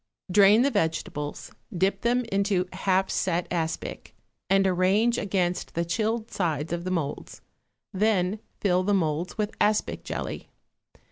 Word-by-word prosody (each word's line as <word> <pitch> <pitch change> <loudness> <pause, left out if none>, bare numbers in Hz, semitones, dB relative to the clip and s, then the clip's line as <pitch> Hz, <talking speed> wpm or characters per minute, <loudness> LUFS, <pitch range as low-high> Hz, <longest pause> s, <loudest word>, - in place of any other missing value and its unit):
Drain 205 +4 +6
the 280 - +2
vegetables, 160 - -2 0.2
dip 190 +2 0
them 245 +1 +1
into 195 -2 +1
half 190 0 +1
set 175 -2 0
aspic, 165 -2 -3 0.3
and 195 0 +4
arrange 190 +6 +2
against 180 -3 -1
the 170 +1 0
chilled 220 +5 -1
sides 160 -3 -1
of 170 0 -3
the - - -1
moulds; 165 -6 -4 0.5
then 200 0 +1 0.2
fill 185 -2 +2
the 200 +2 +1
moulds 165 -1 -1
with 210 0 -1
aspic 210 0 +1
jelly. - - -5
190 Hz, 135 wpm, -26 LUFS, 175-205 Hz, 0.5 s, Drain